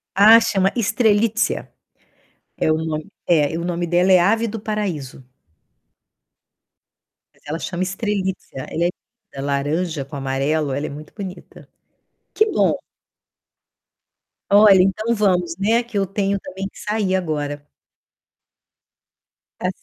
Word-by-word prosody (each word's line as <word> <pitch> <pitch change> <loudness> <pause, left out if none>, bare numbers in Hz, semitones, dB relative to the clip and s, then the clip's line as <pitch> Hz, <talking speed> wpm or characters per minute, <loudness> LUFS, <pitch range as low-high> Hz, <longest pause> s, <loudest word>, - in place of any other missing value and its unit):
Ah, 215 +4 +8
chama 195 -2 +1
Strelitzia. 220 0 +1 0.9
É 155 - +1
o 155 - +2
nome 155 -1 -3 0.2
é, 160 -2 +2
o 170 - -4
nome 175 -1 -2
dela 180 +2 +3
é 185 - +7
ave 225 +6 +2
do 220 0 -5
paraíso. 185 -12 -4 2.1
Mas - - -30
ela 155 +3 -4
chama 180 +1 -3
Strelitzia, 190 - -3
ela 170 - -1
é - - +2 0.5
linda, 135 +1 -4
laranja 145 +2 -1
com 145 - -10
amarelo, 140 +2 -1
ela 145 +3 -2
é - - -4
muito 150 +2 -10
bonita. 190 -4 -9 0.7
Que 435 - +4
bom. - - +2 1.8
Olha, 200 -2 +7
então 215 +5 +1
vamos, 180 -5 +1
né, 225 +4 +2
que 235 -3 -6
eu 195 - +2
tenho 195 +1 -1
também 190 +1 -6
que - - -17
sair 210 -3 -1
agora. 145 -4 -3 1.9
Tá - - -1
185 Hz, 125 wpm, -21 LUFS, 155-205 Hz, 2.1 s, Ah